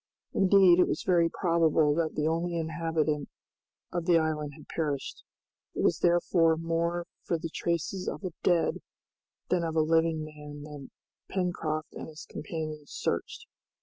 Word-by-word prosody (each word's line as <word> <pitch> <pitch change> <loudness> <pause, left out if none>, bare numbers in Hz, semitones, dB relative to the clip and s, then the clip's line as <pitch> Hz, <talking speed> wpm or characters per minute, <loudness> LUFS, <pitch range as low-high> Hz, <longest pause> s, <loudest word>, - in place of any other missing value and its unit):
Indeed, 190 -2 +6
it 180 - +5
was - - -2
very 170 -3 +4
probable 165 -4 +3
that 160 0 -1
the 150 - 0
only 165 +2 0
inhabitant 160 -2 -1 0.6
of 175 -1 -3
the 175 -2 +6
island 155 -2 -1
had 150 - -14
perished. 145 -4 -3 0.5
It - - -1
was - - +3
therefore 170 -1 +3
more 170 +1 -1 0.2
for 170 - 0
the 165 0 -6
traces 170 +2 -2
of - - -4
a 185 - -3
dead 175 -2 +2 0.7
than 180 -2 +2
of 165 -1 -2
a 160 - +4
living 160 0 +2
man 150 -1 -9
that 145 -2 -9 0.4
Pencroft 165 -5 -2
and - - -7
his 155 -1 -10
companions 155 -1 -6
searched. - - -3
165 Hz, 150 wpm, -29 LUFS, 155-170 Hz, 0.7 s, Indeed